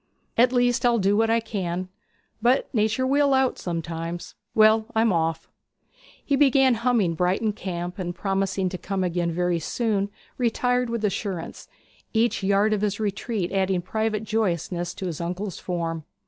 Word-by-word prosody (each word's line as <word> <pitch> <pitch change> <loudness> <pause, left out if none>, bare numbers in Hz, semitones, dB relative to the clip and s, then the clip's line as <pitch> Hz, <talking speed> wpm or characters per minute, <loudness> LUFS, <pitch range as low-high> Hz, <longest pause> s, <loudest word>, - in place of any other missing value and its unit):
'At 245 +2 +5
least 245 -1 +2
I'll 240 -1 +4
do 200 -1 +2
what 225 +1 +2
I 230 +1 +3
can, 185 -5 -3 0.5
but 250 +5 +2
nature 220 +3 +1
will 280 +1 +3
out 265 -1 +1
sometimes. 170 0 -4 0.2
Well, 220 0 +5
I'm 220 -2 +3
off.' 165 -1 -1 0.8
He 280 - +2
began 270 -2 +5
humming 230 -6 +1
'Brighton 185 +6 +1
Camp,' 180 -2 -5
and, 175 -1 -3
promising 195 0 -1
to 185 -1 -6
come 195 -1 -2
again 175 0 0
soon, 200 +3 -1 0.3
retired 245 +1 +1
with 230 -2 -1
assurance, 195 -4 -4 0.5
each 225 -2 +2
yard 200 +2 +3
of 210 - 0
his 205 -1 -1
retreat 210 -2 -2
adding 190 -2 +1
private 220 +2 -1
joyousness 175 -5 -1
to 190 - -5
his 170 -3 -4
uncle's 180 +2 -4
form. 165 -3 -3
200 Hz, 150 wpm, -25 LUFS, 175-230 Hz, 0.8 s, At